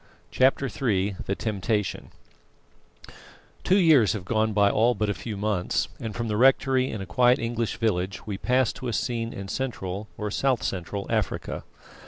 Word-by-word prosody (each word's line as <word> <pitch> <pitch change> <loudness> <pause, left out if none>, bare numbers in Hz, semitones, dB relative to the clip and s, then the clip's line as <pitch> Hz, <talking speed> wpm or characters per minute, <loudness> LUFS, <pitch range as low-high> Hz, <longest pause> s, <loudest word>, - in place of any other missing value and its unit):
CHAPTER 135 +1 +3
III 100 -8 -1
THE 100 - 0
TEMPTATION 105 -2 -2 1.5
Two 190 - +4
years 155 - +5
have 105 -5 -5
gone 110 +1 +1
by 100 -1 +4
all 120 +3 +3
but 105 -1 0
a - - -1
few 105 0 -6
months, 100 -3 -1
and 110 -3 -5
from 120 -1 -2
the 105 -1 -1
rectory 130 +1 +4
in 105 - -5
a - - -5
quiet 120 +8 +4
English 115 -1 -2
village 100 -4 -1
we 100 -2 -4
pass 125 0 +2
to 130 - -7
a 120 - -2
scene 115 -1 -2
in 100 0 -7
Central, 105 -4 -4
or 105 -1 -3
South 130 +1 +1
Central, 100 +2 -3
Africa. 110 -5 -2
110 Hz, 170 wpm, -26 LUFS, 100-125 Hz, 1.5 s, years